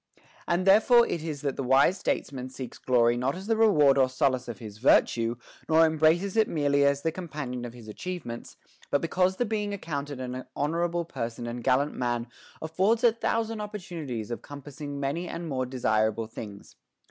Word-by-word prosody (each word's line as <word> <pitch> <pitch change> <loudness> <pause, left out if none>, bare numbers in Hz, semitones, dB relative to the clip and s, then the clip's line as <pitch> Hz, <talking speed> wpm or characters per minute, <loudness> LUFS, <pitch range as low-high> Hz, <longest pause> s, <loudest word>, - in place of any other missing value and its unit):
And 175 +2 +1
there 195 +3 +7
fore 240 0 +6
it 160 - -3
is 150 -4 -4
that 140 -2 -2
the 135 - -2
wise 135 +7 +4
statesman 130 -6 -2
seeks 130 -1 -8
glory 120 -2 +3
not 130 +4 0
as 190 +2 -8
the 225 +1 +1
reward 150 -12 +5
or 130 -1 +4
solace 130 -2 0
of - - -6
his 105 -3 -10
virtue, 115 -1 +3 0.3
nor 160 +1 +6
embraces 160 +5 +2
it 220 -1 +4
merely 145 -2 +2
as 140 0 +2
the 165 - +1
companion 150 -8 -5
of 120 0 -8
his 115 -3 -12
achievements, 120 0 -7 0.3
but 145 - +2
because 180 +3 +1
the 245 - 0
being 210 -2 -2
accounted 145 -6 -5
an 130 0 -5
honorable 170 +3 -1
person 120 -5 -5
and 120 0 -5
gallant 135 +3 +2
man 120 -1 -1 0.4
affords 190 +8 +1
a 240 - +7
thousand 225 -1 -2
opportunities 165 - -6
of 115 - -4
compassing 145 0 -8
many 145 +6 -2
and 170 0 -5
more 130 -4 -2
de 130 +1 -7
sirable 110 -1 +1
things. 105 -3 -10
145 Hz, 185 wpm, -27 LUFS, 125-175 Hz, 0.4 s, there